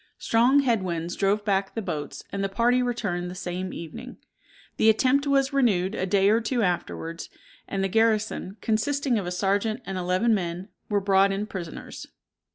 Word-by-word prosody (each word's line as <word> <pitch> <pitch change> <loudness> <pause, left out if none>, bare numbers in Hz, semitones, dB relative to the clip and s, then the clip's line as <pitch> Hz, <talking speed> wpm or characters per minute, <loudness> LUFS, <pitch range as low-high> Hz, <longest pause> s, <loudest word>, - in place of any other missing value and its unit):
Strong 245 +5 +3
head 235 -6 +1
winds 170 -1 -3
drove 205 +1 +1
back 195 -1 0
the - - -1
boats, 150 -5 -5
and 200 0 -2
the 195 - 0
party 240 +5 +2
returned 205 -8 -2
the 180 - -7
same 185 +1 -4
evening. 165 -2 -8 0.6
The 220 - +5
attempt 265 +6 +3
was 275 0 +2
renewed 205 -8 +2
a 190 - -2
day 195 +1 +3
or 225 +2 +3
two 235 +1 0
afterwards, 170 -2 -3 0.4
and 195 -1 -2
the - - +2
garrison, 220 -1 0
consisting 250 +2 0
of 185 - -5
a - - -3
serjeant 205 +5 0
and 190 -1 -4
eleven 185 +6 +2
men, 180 0 -3 0.2
were 205 -1 +1
brought 195 0 +4
in 195 +2 -2
prisoners. 180 -6 -7
200 Hz, 175 wpm, -26 LUFS, 185-230 Hz, 0.6 s, The